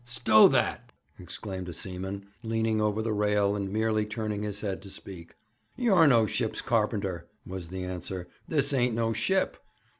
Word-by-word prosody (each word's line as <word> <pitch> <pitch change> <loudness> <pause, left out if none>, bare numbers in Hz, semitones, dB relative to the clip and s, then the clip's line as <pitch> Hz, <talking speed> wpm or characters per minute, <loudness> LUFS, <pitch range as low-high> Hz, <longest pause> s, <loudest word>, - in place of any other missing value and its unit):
'Stow 120 -3 +6
that!' - - 0 0.3
exclaimed 95 -2 -6
a - - -6
seaman, 95 +3 -5 0.2
leaning 110 -1 0
over 105 +1 +1
the 115 -1 -1
rail, 105 -1 +2
and 100 -2 -3
merely 110 0 +1
turning 105 -1 -3
his 105 -1 -4
head 100 -3 -3
to 100 - -11
speak. 90 -3 -10 0.4
'You're 195 -10 +5
no 115 -5 +5
ship's 110 +1 -2
carpenter,' 105 -6 0 0.2
was 95 -2 -6
the 95 +1 -5
answer. 90 0 -5 0.2
'This 145 -2 +1
ain't 125 -3 +2
no 115 0 +1
ship. 190 +10 0
105 Hz, 160 wpm, -28 LUFS, 95-115 Hz, 0.4 s, Stow